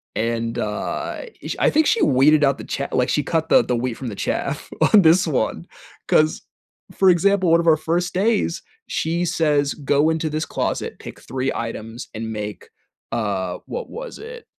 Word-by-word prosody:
and, 115 0 -1
uh, 105 0 -3 0.2
ish - - -4
I - - +3
think 315 +1 +3
she 455 - +2
weeded 145 +4 +4
out 140 -1 +3
the - - -9
cha 140 - -3
like, 125 -1 +1
she 150 - +1
cut 160 0 -1
the - - +6
the 125 - -1
wheat 125 +1 -2
from 130 +2 -7
the 105 - -7
chaff - - -3 0.2
on 205 -3 +8
this 170 +3 +5
one. 135 -9 -1 0.4
'Cause, 155 0 +3 0.5
for 190 - +3
example, 185 0 +3
one 165 0 +5
of 170 - -4
our 160 -1 +6
first 170 +3 -1
days, 200 -3 +1 0.3
she 170 +2 -1
says, 150 -4 +1
"Go 145 +1 +1
into 160 -1 -1
this 155 +1 -2
closet, - - -3
pick - - -10
3 130 +1 -2
items, 115 0 -6
and 110 0 -5
make, 105 -1 -6 0.4
uh" 95 -5 -2
what 485 - -5
was - - -8
it? 470 +2 -10
155 Hz, 185 wpm, -21 LUFS, 120-170 Hz, 0.5 s, on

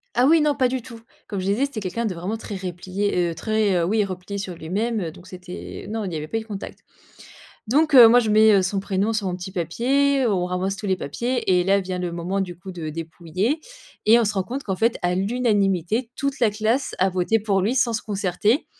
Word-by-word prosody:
Ah 245 - +4
oui, 320 +2 +5
non, 295 -1 +2
pas 260 -3 +3
du 255 0 -2
tout. 230 -1 -11 0.3
Comme 200 -3 -4
je 185 - -4
disais, 210 +8 +2
c'était 275 -6 -5
quelqu'un 200 +4 -3
de 190 -5 -2
vraiment 190 +7 -3
très 210 -2 -7
replié 185 0 -2
heu, - - -7
très 215 -1 +1
heu, 170 - +2
oui 210 +3 +2
replié 190 +1 -5
sur 185 -3 -5
lui-même, 210 +8 -2
heu, 165 -4 -3
donc 180 +2 -15
c'était 180 -1 -9
non 220 -1 -3
il 180 - -4
y - - -3
avait 155 0 -4
pas 225 - -2
eu - - -2
de - - -12
contact. 205 -2 -7 0.9
Donc, 300 +5 +2
heu, 240 -3 +11
moi 245 +2 +6
je 220 -2 -1
mets, 215 0 +6
heu, 195 -2 +5
son 195 +2 -1
prénom 195 +2 0
sur 210 -3 -1
mon 180 -1 -2
petit 180 +1 -7
papier, 260 - +1
on 190 -5 +1
ramasse 185 +2 -2
tous 205 - -6
les 190 -1 +1
papiers 215 - 0
et - - 0
là, 195 +1 +3
vient 185 -1 -4
le 175 -1 -3
moment, 180 +3 -2
du 175 -3 -4
coup, 185 +2 -10
de 165 -4 -5
dépouiller 170 - -3 0.5
et 230 +2 +7
on - - +2
se 205 0 -1
rend 190 - +1
compte 265 +5 -5
qu'en 190 -2 -3
fait, 230 +3 +1
à 175 0 +1
l'unanimité, 205 0 0
toute 280 -1 -2
la 230 -4 +3
classe 220 +6 -1
a 190 - +3
voté 185 +5 +1
pour 200 -2 +1
lui 220 +7 0
sans 240 -2 +2
se 220 - -2
concerter. 205 - 0
200 Hz, 250 wpm, -23 LUFS, 180-230 Hz, 0.9 s, heu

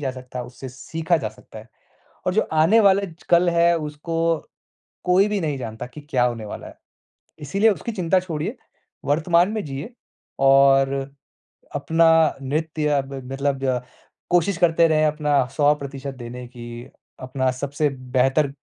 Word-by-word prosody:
जा 135 -2 -1
सकता 125 -1 -7
उससे 125 +2 -9
सीखा 160 +6 -1
जा 110 - -3
सकता 110 0 -14
है 110 +1 -13 0.6
और 185 - +1
जो 215 - +1
आने 165 +9 +5
वाले 200 0 +4
ज 165 0 -16
कल 175 +1 +5
है 170 0 +3
उसको 150 +2 -5 0.9
कोई 185 +3 +4
भी 210 -1 -1
नहीं 150 -4 -2
जानता 115 -1 -6
कि 150 +4 -11
क्या 125 -5 +2
होने 115 -3 -1
वाला - - -8
है। - - -12 0.7
इसीलिए 200 +10 +2
उसकी 230 +4 -4
चिंता 185 -2 +1
छोड़िए। 175 - -4 0.5
वर्तमान 170 +5 +3
में 215 -2 -3
जिए 140 - -6 0.5
और 135 0 +5 0.9
अपना 165 +3 +3 0.3
नृत्य 155 +2 -2
अब 135 0 -4 0.2
मतलब 140 0 -1
जो 130 -2 0 0.5
कोशिश 175 +1 +2
करते 170 -1 +4
रहे 155 -1 +3
अपना 150 -3 +2
100% 140 -2 0
देने 120 +1 -8
की। 120 -1 -9 0.3
अपना 130 0 -1
सबसे 145 +3 -1 0.3
बेहतर 135 +3 +3
150 Hz, 150 wpm, -22 LUFS, 130-170 Hz, 0.9 s, आने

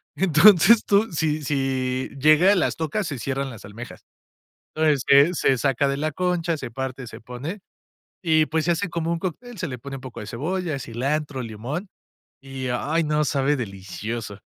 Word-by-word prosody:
Entonces, 195 +4 +6
tú, 205 +2 +2
si 155 -1 -1
si 130 -2 -1
llega, 155 +7 +6
las 175 - +1
tocas, 165 +4 -2
se 140 -5 -5
cierran 135 +1 -2
las 115 -5 -11
almejas. 115 +5 -10 0.7
Entonces, 155 -4 +2
se 140 +6 +6
se 135 -3 +2
saca 140 +1 +1
de 140 - -1
la 155 +1 -2
concha, 175 -1 0
se 120 - -7
parte, 130 0 -5
se - - -10
pone, 135 - -7 0.6
y 155 -3 +3
pues, 160 0 -1
se - - +2
hace 180 +3 -2
como 165 0 -2
un 170 - -1
cóctel. 215 +7 -6
Se 165 - -3
le 125 -2 -6
pone 135 +2 -7
un - - -9
poco 130 -2 -8
de 105 - -7
cebolla, 160 +5 -3
cilantro, 135 +3 -2
limón. 120 - -5 0.5
Y, 135 -1 -5
ay, 150 +7 0
no, 150 0 +1
sabe 145 0 +1
delicioso. 105 0 -6
145 Hz, 175 wpm, -23 LUFS, 130-165 Hz, 0.7 s, Entonces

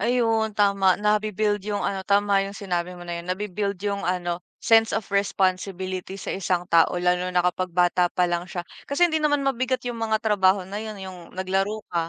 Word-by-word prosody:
ayun 225 -2 +1
tama 200 -2 +3
nabi-build 210 0 +1
yung, 205 -1 -1
ano, 195 -1 -1
tama 200 +1 +2
yung 200 +1 -8
sinabi 180 -2 -3
mo 175 - -10
na 170 0 -4
yun 170 - -13
nabi-build 200 +1 -2
yung, 200 -1 -1
ano, 175 -1 -1 0.2
sense 225 -1 +4
of 220 -2 -2
responsibility 190 -1 -1
sa - - -4
1 180 -2 -1
tao 170 +1 +4
lalo 180 0 +1
na 180 - +3
kapag 180 +1 0
bata 175 0 +3
pa 180 - +2
lang 175 0 -1
siya 175 - -4 0.3
kasi 350 +5 +3
hindi 315 - 0
naman 295 -1 +2
mabigat 255 -1 0
yung 240 - -4
mga 220 -1 +1
trabaho 195 -3 +3
na 200 - -5
yun, 215 -1 -6
eh, - - -6
yung 180 -2 -11
naglaro 195 +3 -1
ka, 165 -1 0
195 Hz, 200 wpm, -24 LUFS, 180-215 Hz, 0.3 s, sense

